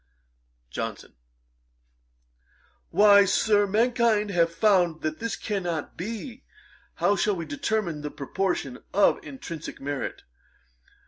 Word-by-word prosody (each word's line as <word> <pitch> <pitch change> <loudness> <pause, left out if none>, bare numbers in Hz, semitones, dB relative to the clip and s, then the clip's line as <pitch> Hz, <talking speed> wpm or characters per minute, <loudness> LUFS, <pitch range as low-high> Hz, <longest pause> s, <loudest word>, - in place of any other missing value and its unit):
JOHNSON. - - -5 1.8
'Why, 205 -1 +7
Sir, 205 +1 +3
mankind 225 -1 +2
have 170 -2 +2
found 175 -4 +2
that 155 0 -2
this 230 0 -2
cannot 175 -7 -3
be. 230 - -6 0.5
How 205 - +2
shall 200 +2 +1
we 170 -2 -5
determine 215 - -2
the 150 - -4
proportion 145 -2 -3 0.2
of 205 - +4
intrinsick 170 - -8
merit? 140 0 -4
200 Hz, 105 wpm, -26 LUFS, 165-220 Hz, 1.8 s, Why